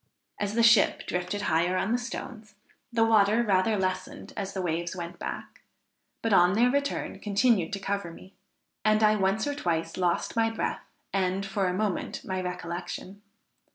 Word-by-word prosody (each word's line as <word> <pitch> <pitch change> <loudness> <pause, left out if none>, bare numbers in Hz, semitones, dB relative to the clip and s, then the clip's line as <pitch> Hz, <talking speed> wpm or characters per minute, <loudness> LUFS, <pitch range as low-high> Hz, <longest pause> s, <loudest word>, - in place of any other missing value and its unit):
As 205 +1 -2
the 230 - +3
ship 225 -2 +5
drifted 180 +3 -2
higher 175 +1 +2
on 195 - 0
the 245 - +2
stones, 220 -3 -7 0.4
the 230 -1 +3
water 220 +1 +4
rather 205 +1 +2
lessened 185 -1 -3
as 195 -2 -4
the 190 - -2
waves 170 +1 -2
went 170 -1 -7
back, - - -6 0.6
but 225 -2 +1
on 180 -1 +6
their 240 +4 +4
return, 280 +1 -2
continued 205 -3 +2
to 200 - -2
cover 200 -2 -2
me, 185 +3 -14 0.5
and 215 0 +3
I 215 0 +5
once 195 +2 +1
or 290 - -1
twice 170 - -2
lost 175 -2 0
my 225 0 +3
breath, 225 - -3 0.3
and, 190 0 0
for 195 -1 -1
a 180 - 0
moment, 205 -2 -2
my 185 -1 -2
recollection. 180 +2 -6
200 Hz, 170 wpm, -28 LUFS, 180-220 Hz, 0.6 s, on